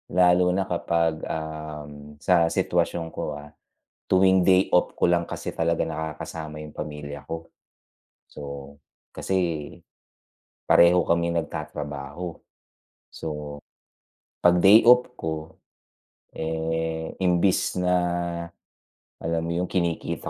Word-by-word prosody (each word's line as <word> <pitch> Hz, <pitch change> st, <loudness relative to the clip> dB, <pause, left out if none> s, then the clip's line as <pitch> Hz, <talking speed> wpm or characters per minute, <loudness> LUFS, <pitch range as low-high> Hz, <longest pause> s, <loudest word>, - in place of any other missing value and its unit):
Lalo 90 Hz, 0 st, +5 dB
na 95 Hz, -, +1 dB
kapag, 85 Hz, -2 st, 0 dB
um, 75 Hz, -2 st, -7 dB
sa 85 Hz, -2 st, +4 dB
sitwasyon 80 Hz, 0 st, 0 dB
ko, 75 Hz, -, -4 dB
ah, 75 Hz, 0 st, -10 dB, 0.5 s
tuwing 95 Hz, -1 st, +4 dB
day 95 Hz, 0 st, +4 dB
off 90 Hz, -, +2 dB
ko -, -, +1 dB
lang 85 Hz, -1 st, +2 dB
kasi -, -, -6 dB
talaga 85 Hz, 0 st, +1 dB
nakakasama 80 Hz, -1 st, -6 dB
yung 75 Hz, -1 st, -10 dB
pamilya 75 Hz, -1 st, -7 dB
ko. 80 Hz, 0 st, -6 dB, 0.8 s
So, 70 Hz, 0 st, -8 dB, 0.4 s
kasi, 95 Hz, -, -3 dB, 1.3 s
pareho 85 Hz, +1 st, +6 dB
kaming 85 Hz, 0 st, +2 dB
nag-tatrabaho. 75 Hz, +2 st, -6 dB, 0.7 s
So, 75 Hz, -2 st, -6 dB, 0.8 s
pag 90 Hz, 0 st, +5 dB
day 100 Hz, +4 st, +8 dB
off 125 Hz, +1 st, +7 dB
ko, 80 Hz, -6 st, -5 dB, 0.8 s
eh, 80 Hz, 0 st, -3 dB
imbis 90 Hz, 0 st, +1 dB
na, 90 Hz, 0 st, +2 dB, 1.2 s
alam 80 Hz, 0 st, -2 dB
mo 85 Hz, +1 st, -3 dB
yung 90 Hz, -, 0 dB
kinikita 85 Hz, -3 st, -2 dB
80 Hz, 105 wpm, -25 LUFS, 75-90 Hz, 1.3 s, day